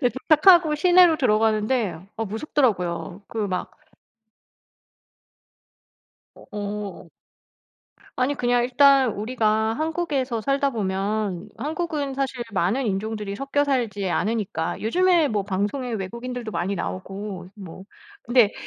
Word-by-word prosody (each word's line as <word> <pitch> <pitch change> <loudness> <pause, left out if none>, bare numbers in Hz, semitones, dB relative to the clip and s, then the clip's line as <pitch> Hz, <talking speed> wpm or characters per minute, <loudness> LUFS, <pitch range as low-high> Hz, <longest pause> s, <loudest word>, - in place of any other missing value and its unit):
그 245 -4 +2
도착하고 310 +4 +5
시내로 350 +1 +5
들어가는데 215 - +1 0.2
어 225 - -2
무섭더라고요. 200 - -1
그 225 - -7
막 180 -1 -3 2.6
어. 205 -1 -7 1.1
아니 255 +3 +1
그냥 245 -2 +1
일단 265 -1 +5
우리가 220 0 0
한국에서 295 -5 -2
살다 275 +4 +1
보면 200 -3 -2
한국은 300 0 -3
사실 265 -2 -2
많은 205 +8 0
인종들이 210 0 -3
섞여 275 +4 0
살지 230 -9 -1
않으니까 195 -4 -2
요즘에 345 +6 +3
뭐 210 -4 -1
방송에 205 +6 -2
외국인들도 235 +3 -5
많이 200 -1 -2
나오고 190 - -6
뭐 190 -3 -10 0.4
근데 240 -3 +4
225 Hz, 255 characters per minute, -23 LUFS, 200-275 Hz, 2.6 s, 도착하고